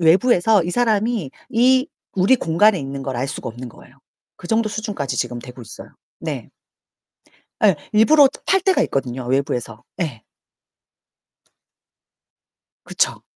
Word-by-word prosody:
외부에서 190 +2 +4
이 175 - -3
사람이 220 - 0 0.2
이 255 +2 +3 0.3
우리 190 +7 +4
공간에 205 0 +3
있는 135 -1 -6
걸 135 - -3
알 135 +3 -2
수가 - - -5
없는 120 +2 -9
거예요. 130 +3 -18 0.4
그 175 - -11
정도 225 0 +1
수준까지 210 - -4
지금 120 - -2
되고 125 +1 -11
있어요. 110 - -11 0.3
네. - - -5 1.1
에, 195 -6 +5 0.2
일부러 275 +7 +6
저 - - -13
팔 385 0 +3
때가 380 0 +2
있거든요, 130 -2 -3
외부에서. 125 -4 -2 0.2
예. 130 -10 -5 2.6
그쵸? - - -1
175 Hz, 265 characters per minute, -20 LUFS, -, 2.6 s, 일부러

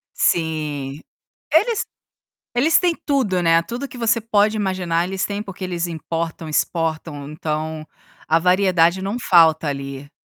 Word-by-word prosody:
Sim, 150 -4 -1 0.5
eles 465 -3 +3 0.7
eles 295 +7 +4
têm 350 -2 +2
tudo, 245 - +1
né, 165 0 +4
tudo 240 +10 -5
que 250 - -11
você 230 0 +2
pode 215 0 +2
imaginar 180 -4 0
eles 190 0 -2
têm 205 0 -3
porque 195 -2 -10
eles 175 -1 -2
importam, 165 0 -4
exportam. 155 -2 -2
Então, 155 0 -4 0.4
a 160 +1 +3
variedade 180 -1 +3
não 200 +5 -2
falta 160 -5 +4
ali. 140 0 -5
170 Hz, 135 wpm, -21 LUFS, 160-205 Hz, 0.7 s, eles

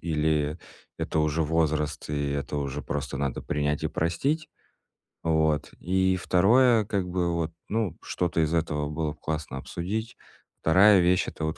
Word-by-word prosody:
или 75 -1 0 0.4
это - - -2
уже 75 +1 +1
возраст, 75 -1 0
и 75 -1 -1
это 70 +1 -3
уже 70 0 -3
просто 70 - -4
надо 70 -2 -2
принять 75 0 -1
и - - 0
простить. 135 - -1 0.8
Вот. 80 -2 +1
И 95 +1 +1
второе 110 +7 +4
как-бы 90 -3 -1
вот, 80 -1 -1 0.2
ну, 105 -6 -1
что-то 85 -2 -1
из 80 +1 -1
этого 75 -3 0
было 75 0 -2
б 75 - -21
классно 75 -3 -4
обсудить. 95 - -4 0.4
Вторая 95 +5 +6
вещь- 90 +1 +3
это 80 - -5
вот 80 - -3
80 Hz, 150 wpm, -27 LUFS, 75-90 Hz, 0.8 s, Вторая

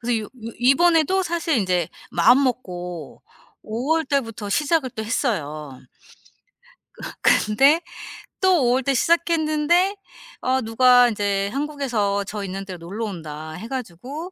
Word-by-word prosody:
그래서 235 0 0
요 - - -10 0.3
이번에도 325 +8 +3
사실 335 -4 0
이제 180 -5 0 0.2
마음 255 +4 +5
먹고 180 - -5 0.4
5 225 +4 -4
월 325 -1 +1
달부터 230 -7 -2
시작을 295 +2 +1
또 220 -1 -6
했어요. 155 - -3 1.2
어 - - -14 0.4
근데 275 +10 +4 0.6
또 365 -8 +4
5월 250 +2 +2
때 275 - +1
시작했는데 335 +4 +2 0.5
어 260 +1 +1
누가 245 +2 +5
인제 200 -2 -1
한국에서 245 -8 -1
저 205 +1 -5
있는 195 0 -5
데로 185 -2 -7
놀러 200 +7 -5
온다 155 -5 -7
해 220 +8 -8
가지고 265 - -6
245 Hz, 250 characters per minute, -22 LUFS, 200-295 Hz, 1.2 s, 마음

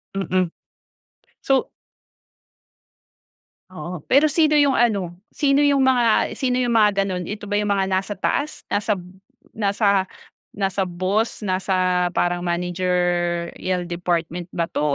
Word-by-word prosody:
Mm. 185 -2 0 0.9
So 270 -1 +1 2.0
Oo, 175 -1 -7
pero 280 +4 +5
sino 305 0 +3
'yong 285 -2 +4
ano, 200 -9 +1 0.2
sino 280 -1 +2
'yong 285 -1 +4
mga 245 -4 +3
sino 250 -2 -1
'yong 245 -2 +1
mga 215 -2 +5 0.2
gano'n? 185 -2 -3
Ito 210 0 -6
ba 205 - -5
'yong 205 0 0
mga 195 -1 +2
nasa 190 +1 -2
taas, 285 +10 -2
nasa 205 0 -1
b 180 0 -12 0.4
nasa 200 -2 +1 0.5
nasa 195 -1 -1
boss, 195 +5 -1
nasa 185 -1 +1
parang 175 0 +1
managerial 175 0 -1
department 175 0 -3
ba 170 - -1
'to - - -4
190 Hz, 125 wpm, -22 LUFS, 180-220 Hz, 2.0 s, pero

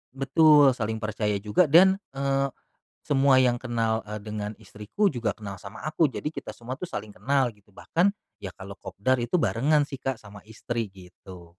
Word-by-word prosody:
Betul, 145 +1 +5
saling 110 -2 -3
percaya 105 -1 -1
juga 105 - +2
dan, 190 +6 +6 0.2
eee, 135 0 +1 0.6
semua 135 -2 +4
yang 125 -1 +3
kenal, 115 -2 -1
eee, 105 0 -6
dengan 105 0 -5
istriku 105 - -3
juga 115 -3 -1
kenal 100 -2 -7
sama 105 +4 -10
aku, 155 -1 +2
jadi - - -7
kita 155 - -7
semua 120 +2 -7
tuh 180 +5 -7
saling 105 0 -6
kenal 135 -2 +1
gitu. 105 0 -27
Bahkan, 170 - +1 0.3
ya 95 - -5
kalau 100 +1 -9
kopdar 130 +6 -1
itu 150 +10 0
barengan 140 - +2
sih, 135 - -8
Kak, 135 -3 -2
sama 100 -1 -13
istri 115 -1 -4
gitu. 90 -1 -14
120 Hz, 175 wpm, -26 LUFS, 105-140 Hz, 0.6 s, dan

